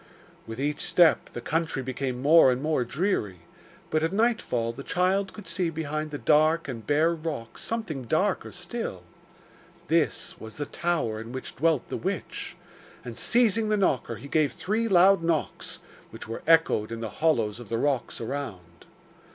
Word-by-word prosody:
With 115 +2 -7
each 145 +2 -1
step 170 -4 +4
the 120 - -5
country 160 -1 -1
became 130 0 -3
more 150 -2 +7
and 125 - -1
more 150 -2 0
dreary, 120 - -1 0.5
but 155 - +2
at 165 +1 0
nightfall 200 - 0
the 135 - -8
child 185 +5 +1
could 210 - -11
see 170 +1 -1
behind 155 -1 -3
the 145 - -5
dark 155 +3 +3
and 115 -5 -7
bare 155 +3 +3
rocks 155 -8 -6
something 185 - -4
darker 185 - 0
still. 180 - -6 0.9
This 165 -1 +1
was 110 0 -9
the 145 - -3
tower 155 -11 -1
in 115 +1 -9
which 130 - -6
dwelt 160 -2 +1
the - - -3
witch; - - -4 0.5
and 120 -2 -6
seizing 225 - +2
the 210 - +2
knocker 130 - +1
he 140 - -10
gave 150 -1 +1
three 220 +4 -1
loud 195 -1 +5
knocks, 165 -2 -2 0.3
which - - -9
were 115 - -5
echoed 160 -10 +4
in 115 0 -5
the 115 - -3
hollows 115 -9 +2
of 120 -4 -10
the 115 - -1
rocks 135 0 -1
around. 110 -10 -6
155 Hz, 165 wpm, -27 LUFS, 120-170 Hz, 0.9 s, more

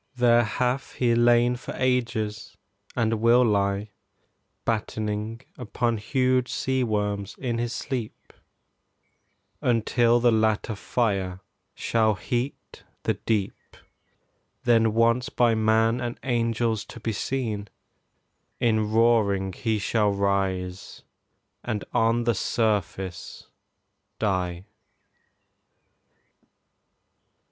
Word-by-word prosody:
There 120 -1 +4
hath 125 +4 -1
he 120 -2 +1
lain 120 +1 +4
for 130 - -8
ages, 115 -4 -1 0.4
and 115 -2 0
will 120 +2 +5
lie 100 -1 0 0.7
Battening 110 0 -2 0.2
upon 120 -1 -1
huge 130 +2 +1
sea 130 -1 0
worms 105 -3 -2
in 120 -3 -2
his 120 0 -2
sleep, 125 -3 -5 1.3
Until 120 0 +3
the 120 0 +4
latter 110 0 +1
fire 100 -4 -1 0.3
shall 110 -2 +1
heat 120 +7 -4 0.2
the - - +1
deep; 105 -4 -3 0.9
Then 115 -2 +3
once 115 +2 +2
by 120 -2 +3
man 110 +2 +2
and 120 0 -4
angels 115 -3 0
to - - -11
be 110 0 -2
seen, 110 -3 -3 0.9
In 110 -2 +1
roaring 110 -4 +2
he 110 +4 -1
shall 105 +1 +1
rise 95 -2 -2 0.6
and 105 -3 -3
on 115 +1 +2
the 120 0 +2
surface 100 -4 -2 0.7
die. 95 -3 -1
115 Hz, 95 wpm, -25 LUFS, 105-120 Hz, 1.3 s, will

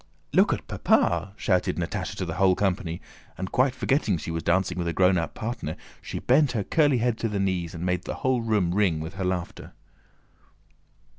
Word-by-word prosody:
"Look - - +5
at - - -2
Papa!" 85 +3 +1
shouted 90 -4 +1
Natásha - - -3
to - - -3
the - - -4
whole 95 -1 +3
company, 90 -3 -1 0.4
and 95 0 -5
quite 130 0 +2
forgetting 130 -8 +1
that 80 - -6
she - - -4
was 80 0 -2
dancing 90 +2 +1
with 85 - -1
a 85 - -1
grown 90 +1 +4
up 85 -1 -2
partner 115 -9 -4 0.3
she - - -6
bent 135 +1 +3
her 110 -4 -1
curly 145 +2 +3
head 120 -1 0
to 115 - -1
her 105 - -2
knees 90 -3 -1
and 85 +2 -4
made 90 0 -1
the - - -4
whole 130 -2 +2
room 105 -6 +1
ring 95 -6 +2
with 80 +3 -6
her 95 - -4
laughter. 90 -2 -4
95 Hz, 205 wpm, -26 LUFS, 85-115 Hz, 0.4 s, Look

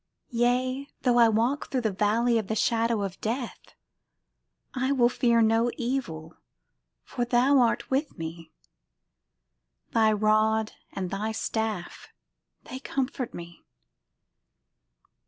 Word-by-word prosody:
Yea, 250 +3 0 0.2
though 245 -2 +3
I 230 -1 +7
walk 235 +6 0
through 260 - -1
the 220 -3 0
valley 225 +4 +2
of 210 - -5
the 220 - -2
Shadow 230 -1 +1
of 195 -1 -6
death, 235 +2 -4 1.0
I 260 +1 0
will 245 -3 +4
fear 235 -2 +3
no 225 +2 +3
evil: 185 -11 -3 0.7
For 245 - -3
Thou 250 +3 +3
art 240 +1 +1
with 280 +3 -1
me; 165 0 -7 1.4
Thy 220 -1 +4
rod 215 +1 +2 0.2
and 185 -2 -4
Thy 210 +3 -2
staff 220 -4 -3 0.6
they 260 - -8
comfort 265 -2 -3
me. 170 -1 -10
230 Hz, 120 wpm, -27 LUFS, 215-250 Hz, 1.4 s, I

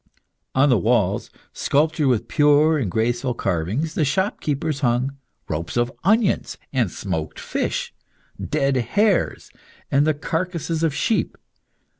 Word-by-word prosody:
On 140 +2 +4
the 125 -5 +4
walls, - - +1 0.2
sculptured 155 +1 +1
with 120 -4 +1
pure 150 +1 +4
and 115 -8 -1
graceful 120 +5 0
carvings, 100 - -1
the 155 - +1
shop 190 +8 0
keepers 145 0 -1
hung 130 +1 0 0.3
ropes 85 +7 -3
of 120 +1 +1
onions, 210 +2 +2 0.2
and 125 -7 +1
smoked 80 -5 -4
fish, - - -2 0.5
dead 135 0 0
hares, 200 - +1 0.4
and 140 +2 +3
the 155 - +2
carcases 165 +1 -2
of 160 -4 +1
sheep. 215 +10 0
140 Hz, 130 wpm, -22 LUFS, 120-160 Hz, 0.5 s, On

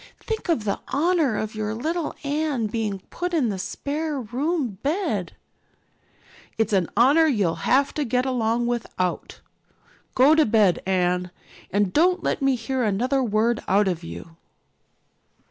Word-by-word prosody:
Think 440 -4 -5
of 315 -10 +1
the 200 -2 -2
honor 305 -6 +1
of 215 0 -3
your 215 0 -3
little 320 +7 -2
Anne 290 -4 -1
being 210 -3 -3
put 355 0 -3
in 265 -8 +2
the 195 -2 -3
spare 295 +7 -3
room 255 - -2
bed." 340 +8 -1 1.2
"It's 220 -1 0
an 185 -4 +2
honor 285 +7 +5
you'll 205 - 0
have 275 +2 +3
to 300 - -1
get 250 0 0
along 240 -2 0
without. 220 -7 -3 0.7
Go 270 +4 +6
to 315 0 +5
bed, 210 -5 +3
Anne, 180 -1 +1 0.4
and 200 -1 0
don't 360 +3 +3
let - - -1
me 270 -1 +3
hear 250 +2 -3
another 245 +6 +1
word 225 0 +1
out 200 +1 +3
of 180 -3 -2
you." 85 - -9
240 Hz, 145 wpm, -24 LUFS, 210-295 Hz, 1.2 s, Go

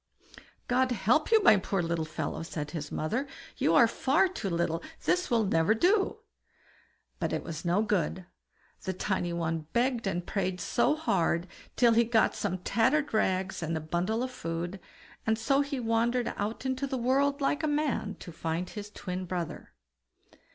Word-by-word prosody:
"God 255 +1 +2
help 245 - +2
you, 445 -2 +6
my 215 -2 +7
poor 190 -1 -1
little 165 -1 -1
fellow!" 155 - -4
said 155 -2 -5
his 150 -3 -5
mother; 230 - -1 0.3
"you 165 - +2
are 235 - +7
far 285 +11 +2
too 350 - -4
little, 170 -1 0 0.2
this 360 0 +1
will 230 -2 +3
never 165 +1 +3
do." 385 - +2 1.0
But - - -1
it - - -2
was 155 -2 -6
no 180 +4 +2
good; 185 -3 -1 0.6
the 190 - -3
tiny 185 -1 -1
one 165 -2 -2
begged 240 -2 +1
and 175 -2 -2
prayed 185 -3 -2
so 240 - +2
hard, 170 - +1 0.3
till 235 -2 +5
he 235 +1 +5
got 225 -1 +3
some 200 -3 -2
old 185 -1 -6
tattered 275 +6 +2
rags 190 -4 0
and 160 0 -1
a - - -2
bundle 175 +9 -1
of 255 - -3
food; 170 -2 -4 0.5
and 220 0 +3
so 275 +5 +2
he 280 -1 -3
wandered 235 +1 +1
out 215 +5 -3
into 260 +1 -1
the 265 - -2
world 275 +4 +2
like 285 +1 +1
a 310 - 0
man, 290 -9 0
to 175 - -8
find 165 +2 -3
his 210 -1 -7
twin 185 -2 -5
brother. 175 -2 -5
210 Hz, 175 wpm, -29 LUFS, 175-255 Hz, 1.0 s, my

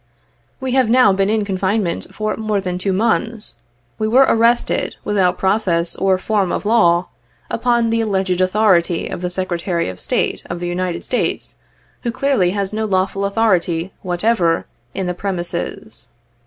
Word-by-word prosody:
We 260 -1 -3
have 255 -3 +2
now 240 -4 +5
been 195 +1 +1
in 215 -1 +1
coufincmeut 195 -1 -1
for 215 0 -2
more 215 -2 -1
than 180 -2 -3
two 195 +1 -1
months. 225 - -1 0.4
We 215 - 0
were 260 +5 +5
arrested, 235 +1 +2
without 185 -3 +1
process 190 -4 +1
or 190 -1 +2
form 195 -2 0
of - - -3
law, 175 -6 +3 0.5
upon 235 -2 +1
the 230 0 +1
alleged 190 -4 0
authority 185 -3 +2
of - - -6
the 180 - -2
Secretary 175 - -2
of 90 -1 -9
State - - -1
of 175 - -4
the 175 - -3
United 175 0 -2
States, - - -1 0.5
who 240 - -2
clearly 240 -7 +1
baa 200 0 -1
no 220 +1 -1
lawful 195 0 0
authority, 190 -4 +1
whatever, 180 -2 +1 0.3
in 190 - -2
the 180 - -1
premises. 175 - -4
195 Hz, 155 wpm, -19 LUFS, 180-220 Hz, 0.5 s, now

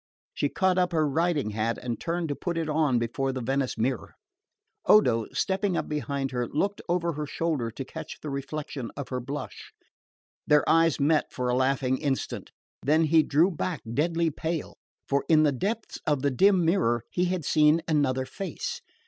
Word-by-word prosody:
She 145 - 0
caught 185 +2 +2
up 180 -1 +1
her 155 -2 +2
riding 150 -5 0
hat 110 +2 -1
and 120 -2 -4
turned 170 0 -2
to 145 - -1
put 175 +2 -3
it 165 -1 -1
on 150 -4 +2
before 120 +3 -1
the 130 - -4
Venice 135 +2 -1
mirror. 125 0 -2 0.7
Odo, 115 - +5
stepping 190 -1 0
up - - -2
behind 140 -2 -2
her, 125 -2 -1
looked 200 - -1
over 170 -1 +1
her 150 0 -4
shoulder 150 -6 -1
to 130 +4 -7
catch 160 +2 -8
the 150 - -6
reflection 140 -2 -5
of 140 - -5
her 125 - -2
blush. 140 +4 -7 0.8
Their 150 0 +4
eyes 165 -2 +4
met 150 +2 +2
for 125 -1 -2
a 125 - +2
laughing 130 0 +1
instant; 140 -3 -2 0.3
then 155 +3 +3
he 160 +1 +5
drew 155 +5 +3
back 165 -1 -3
deadly 165 +3 +1
pale, 160 +1 -3 0.3
for 140 0 +1
in 155 -1 +6
the 150 - +4
depths 210 - -3
of 145 -3 +1
the 140 - +2
dim 185 +5 +4
mirror 120 - +2
he 180 - +1
had 180 -4 -2
seen 155 +2 +4
another 130 -4 +1
face. 195 +8 -5
150 Hz, 180 wpm, -27 LUFS, 130-165 Hz, 0.8 s, in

